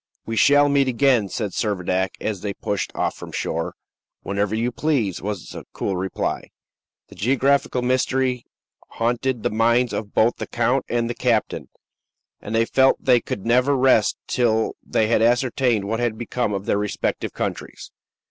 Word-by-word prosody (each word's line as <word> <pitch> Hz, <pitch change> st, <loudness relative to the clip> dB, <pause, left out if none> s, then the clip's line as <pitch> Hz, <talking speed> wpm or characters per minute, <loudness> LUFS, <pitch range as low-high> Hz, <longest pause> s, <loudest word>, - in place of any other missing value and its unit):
"We 115 Hz, -, -4 dB
shall 145 Hz, +5 st, +5 dB
meet 140 Hz, -1 st, +2 dB
again," 125 Hz, -4 st, +2 dB
said 105 Hz, -2 st, -3 dB
Servadac, 95 Hz, -3 st, -1 dB
as 105 Hz, -4 st, -3 dB
they 100 Hz, -2 st, -4 dB
pushed 100 Hz, -, -3 dB
off -, -, 0 dB
from -, -, -10 dB
shore. 80 Hz, 0 st, -3 dB, 0.5 s
"Whenever 100 Hz, +1 st, -1 dB
you 120 Hz, +2 st, 0 dB
please," 120 Hz, -, -1 dB
was 100 Hz, -3 st, -5 dB
the -, -, -8 dB
cool 100 Hz, -, -2 dB
reply. 95 Hz, 0 st, -3 dB, 0.6 s
The -, -, -13 dB
geographical 135 Hz, +2 st, +1 dB
mystery 130 Hz, 0 st, 0 dB, 0.5 s
haunted 120 Hz, +1 st, -1 dB
the -, -, 0 dB
minds 115 Hz, +2 st, +2 dB
of 100 Hz, -2 st, -5 dB
both 115 Hz, +2 st, +3 dB
the -, -, -5 dB
count 120 Hz, +3 st, 0 dB
and 120 Hz, -1 st, 0 dB
the 120 Hz, -, -2 dB
captain, 115 Hz, -3 st, -1 dB, 0.7 s
and 110 Hz, -, -4 dB
they 115 Hz, 0 st, +3 dB
felt 135 Hz, +2 st, +3 dB
they 125 Hz, -2 st, +5 dB
could 100 Hz, -, -5 dB
never 125 Hz, +4 st, +3 dB
rest 130 Hz, -5 st, +3 dB
till 110 Hz, -3 st, +1 dB
they 110 Hz, -, +1 dB
had 110 Hz, 0 st, +2 dB
ascertained 120 Hz, -2 st, +2 dB
what 115 Hz, +3 st, -2 dB
had 120 Hz, -2 st, -1 dB
become 120 Hz, -1 st, -2 dB
of 100 Hz, 0 st, -3 dB
their 100 Hz, -, +1 dB
respective 105 Hz, -1 st, -2 dB
countries. -, -, -5 dB
115 Hz, 165 wpm, -22 LUFS, 105-125 Hz, 0.7 s, shall